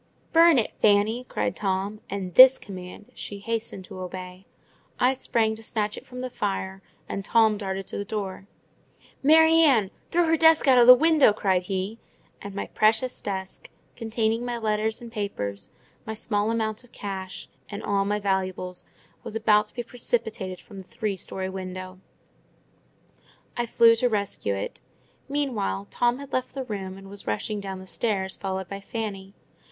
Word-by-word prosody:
"Burn 335 -2 +7
it, 225 - 0
Fanny!" 215 +4 +3
cried 180 - -2
Tom: 195 +1 -2
and 190 -3 -4
this 260 +4 +10
command 185 +1 -10
she 205 - -6
hastened 220 -2 -3
to 190 -1 -10
obey. 185 0 -8 0.5
I 255 +2 +4
sprang 225 -4 +1
to - - -9
snatch 210 -1 -2
it - - -11
from 250 0 -7
the 255 0 -4
fire, 195 -3 -3 0.3
and 195 - -4
Tom 220 +1 +4
darted 195 -2 -4
to - - -5
the - - -2
door. 200 -2 -5 0.7
"Mary 320 +3 +6
Ann, 240 -11 +4 0.2
throw 345 +1 +3
her 325 0 +3
desk 320 -1 +5
out 255 -2 +7
of 240 - +6
the 250 - +12
window!" 310 -5 +5
cried 190 -3 +1
he: 190 +4 -3 0.4
and 200 -1 -8
my 200 - -3
precious 220 +4 +1
desk, 190 -1 -5 0.3
containing 225 0 -1
my 245 -1 -2
letters 220 0 -1
and 235 - -9
papers, 100 - -4 0.3
my 220 - -5
small 210 -1 -1
amount 220 0 -1
of 245 - -21
cash, 190 -2 -6 0.2
and 205 0 -6
all 200 -1 +1
my 205 +1 0
valuables, 185 -2 -1 0.4
was 220 - -7
about 215 -1 +3
to - - -12
be 240 - -3
precipitated 220 -6 -3
from 200 - -13
the 185 - -17
three 220 -4 -3
storey 190 0 -5
window. 185 0 -7 1.6
I 240 0 -1
flew 230 0 +6
to 245 +2 +2
rescue 200 - -1
it. 95 - -5 0.5
Meanwhile 225 - -2
Tom 240 0 +1
had 280 0 -10
left 255 +1 -2
the 270 - -3
room, 195 -5 -5
and 195 0 -12
was 200 +1 -7
rushing 205 - -2
down 195 -1 -5
the 185 - -10
stairs, 190 -1 -2
followed 190 -1 -4
by 200 +2 -7
Fanny. 200 -3 -5
210 Hz, 170 wpm, -25 LUFS, 190-235 Hz, 1.6 s, the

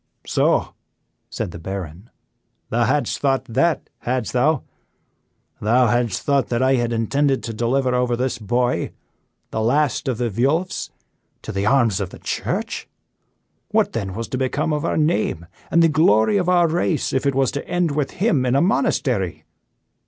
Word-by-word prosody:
"So!" - - +1 0.6
said - - -4
the 85 - -9
Baron, 95 +2 -7 0.6
"thou 120 +1 +2
hadst 145 +5 0
thought 135 -2 +1
that, 140 +8 0
hadst 125 -5 -2
thou? 140 +3 +2 1.0
Thou 120 +4 +4
hadst 120 -3 0
thought 140 -4 +2
that 120 +1 +1
I 130 +1 +4
had 120 -2 +1
intended 135 +5 +1
to 115 - -4
deliver 125 +3 0
over 125 -1 +1
this 125 -1 -2
boy, 120 +3 0 0.6
the 110 - -2
last 145 +5 +1
of 130 -4 0
the 120 -1 -1
Vuelphs, 140 - 0 0.5
to - - -5
the 100 +1 -1
arms 115 -6 +3
of 95 - -3
the - - -11
Church? - - -3 0.8
What - - +1
then 100 -5 -3
was 115 +1 -4
to 130 - -3
become 140 +4 0
of 150 - -1
our - - 0
name 150 - 0 0.2
and 170 0 +4
the - - +6
glory 155 - +3
of 180 -2 0
our 175 -2 +4
race 165 -2 0
if 130 +2 +1
it 140 - +1
was 135 -1 +2
to 140 - -5
end 175 -3 0
with 145 -1 -1
him 190 - +1
in 125 0 +1
a - - +4
monastery? 190 +5 0
130 Hz, 170 wpm, -21 LUFS, 115-145 Hz, 1.0 s, the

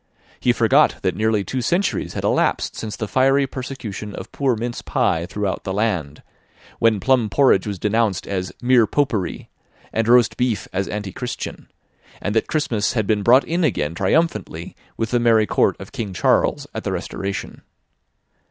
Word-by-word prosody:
He - - +3
forgot - - +4
that - - 0
nearly 110 -1 +1
two 130 +5 -3
centuries 175 - 0
had - - -3
elapsed - - +1
since 110 -2 -5
the 110 - -4
fiery 135 +4 +3
persecution 125 -6 -6
of - - -8
poor 135 -4 +1
mince 120 +2 -4
pie 85 +1 0
throughout 100 0 -3
the 95 - -3
land; 90 -10 -1 0.6
when 115 -2 +3
plum 125 0 +2
porridge 105 -3 +3
was 100 -2 -3
denounced 105 0 0
as 95 -2 -3
"mere 120 -3 +5
popery," 115 -10 -1 0.4
and 115 0 0
roast 120 0 +4
beef 120 -6 0
as 95 +1 -1
antichristian; 105 +4 -5 0.5
and 105 - -3
that 110 - +1
Christmas 120 -8 0
had 110 -4 0
been 105 0 +1
brought 125 +6 +5
in 170 +2 -1
again 80 - 0
triumphantly 155 - -1 0.2
with 115 -1 -2
the 120 - +3
merry 115 -2 +4
court - - +2
of 95 - -10
King 115 -8 -5
Charles - - +2
at - - -5
the - - -2
Restoration. 100 0 -5
110 Hz, 165 wpm, -21 LUFS, 100-125 Hz, 0.6 s, mere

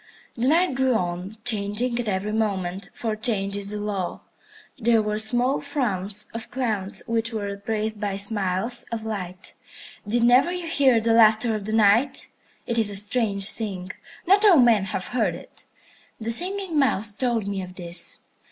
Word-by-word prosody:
The 245 +2 -1
Night 335 +2 +3
grew 260 -1 +1
on, 180 +1 -3
changing 230 +2 +1
at 240 - -3
every 200 +1 -1
moment, 195 -3 -2
for 225 -2 -3
change 210 -3 +2
is 200 0 -2
the 210 0 -2
law. 200 -4 -3 0.6
There 230 0 +3
were 210 0 -1
small 245 +5 +3
frowns 210 -8 -3
of 230 0 -7
clouds 215 -7 -2
which 230 0 -1
were 215 -2 -3
replaced 215 +1 -3
by 200 -2 -2
smiles 200 +3 -1
of 225 -1 -4
light. 185 -5 -6 0.5
Did 235 +3 +1
never 250 +8 +5
you 360 -1 -4
hear 275 -7 +3
the 225 +1 +1
laughter 225 0 +4
of 210 -2 -4
the 215 - -4
Night? 225 +5 +3 0.4
It 235 0 -1
is 220 -2 +3
a 200 - -3
strange 205 -1 +2
thing. 190 -5 -5 0.3
Not 395 +4 +5
all 395 -6 +7
men 235 -6 +4
have 190 -1 -4
heard 245 -3 0
it. - - -14 0.5
The 225 0 -3
Singing 365 +3 -1
Mouse 220 -6 +1
told 230 -2 -1
me 200 -1 -3
of 185 0 -9
this. 175 -1 -3
220 Hz, 170 wpm, -24 LUFS, 200-240 Hz, 0.6 s, all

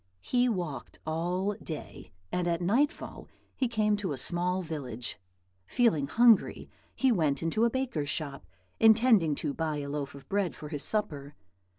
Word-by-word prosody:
He 250 0 +2
walked 170 - -4
all 175 +5 -1
day, 155 -3 -8 0.2
and 180 -1 0
at 170 -1 +1
nightfall 235 +12 0 0.3
he 255 - +1
came 215 -2 +2
to 195 -7 -2
a - - -5
small 180 +6 0
village. 125 - -4 0.5
Feeling 165 - +2
hungry, 230 +4 +4 0.2
he 265 -1 +3
went 155 - +1
into 215 +8 +2
a - - +4
baker's 235 - -2
shop, 145 -3 -4 0.3
intending 220 - +5
to 140 - -2
buy 155 -1 -2
a 140 -1 -4
loaf 140 -1 -4
of 140 - -13
bread 195 -4 0
for 150 - -8
his 145 -3 -4
supper. 145 -9 -2
175 Hz, 160 wpm, -29 LUFS, 145-220 Hz, 0.5 s, intending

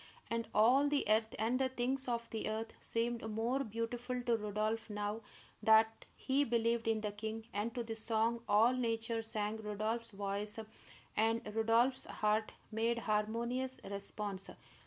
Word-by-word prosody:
And 230 0 -1
all 250 +7 +5
the 290 -1 +1
earth 220 +1 +2
and 230 +4 +1
the 265 -1 +2
things 260 +1 0
of 235 -1 -1
the 220 -1 -2
earth 220 +1 -3
seemed 235 +1 -1
more 235 +5 0
beautiful 240 +2 -3
to 240 -1 +3
Rodolph 215 +1 -1
now 210 +1 -2 0.4
that 220 +1 +5
he 275 +2 +2
believed 230 -2 +1
in 220 -1 +2
the 210 -1 -2
king; 220 +2 -5
and 210 +3 -1
to 240 - -1
the 225 -1 -5
song 225 +1 +1
all 225 +4 +6
Nature 230 -2 0
sang 215 -1 -2
Rodolph's 220 +2 -2
voice 200 +1 -3 0.6
and 225 +1 +2
Rodolph's 230 +4 +3
heart 215 +1 0 0.2
made 230 +2 +1
harmonious 235 +4 -1
response. 200 0 -2
225 Hz, 150 wpm, -35 LUFS, 215-235 Hz, 0.6 s, all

